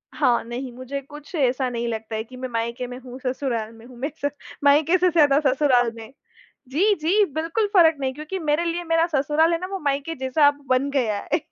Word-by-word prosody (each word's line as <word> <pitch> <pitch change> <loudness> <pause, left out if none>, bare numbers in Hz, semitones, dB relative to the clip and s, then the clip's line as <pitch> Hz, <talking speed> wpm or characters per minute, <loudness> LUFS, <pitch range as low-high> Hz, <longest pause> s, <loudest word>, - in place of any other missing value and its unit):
हाँ, 255 -5 +2
नहीं, 245 +2 -6
मुझे 255 +3 -5
कुछ 295 +3 -13
ऐसा 260 -2 +1
नहीं 235 -1 -3
लगता 225 -1 -4
है 220 - -2
कि 255 +3 -14
मैं 255 0 -5
मायके 235 +2 -3
में 250 0 -7
हूँ, 255 0 -10
ससुराल 250 -4 -2
में 225 +1 -15
हूँ। 250 -1 -14
मैं 270 +5 -2 0.2
स - - +3 0.3
मायके 300 +5 +5
से 365 0 +3
ज़्यादा 295 -4 +4
ससुराल 255 -3 +3
में 225 0 -10 0.6
जी, 375 +11 +3
जी 370 +6 +2
बिल्कुल 330 +8 0
फ़र्क 330 -4 +6
नहीं 265 -1 -1
क्योंकि 305 +7 -5
मेरे 310 +1 0
लिए 340 +1 -2
मेरा 330 0 +2
ससुराल 295 +4 +2
है 330 - 0
ना, 365 - -4
वो 390 0 -5
मायके 285 +2 -2
जैसा 265 +2 +3
अब 290 0 0
बन 260 +2 +2
गया 235 -7 0 0.2
है - - +4
275 Hz, 220 wpm, -23 LUFS, 250-315 Hz, 0.6 s, फ़र्क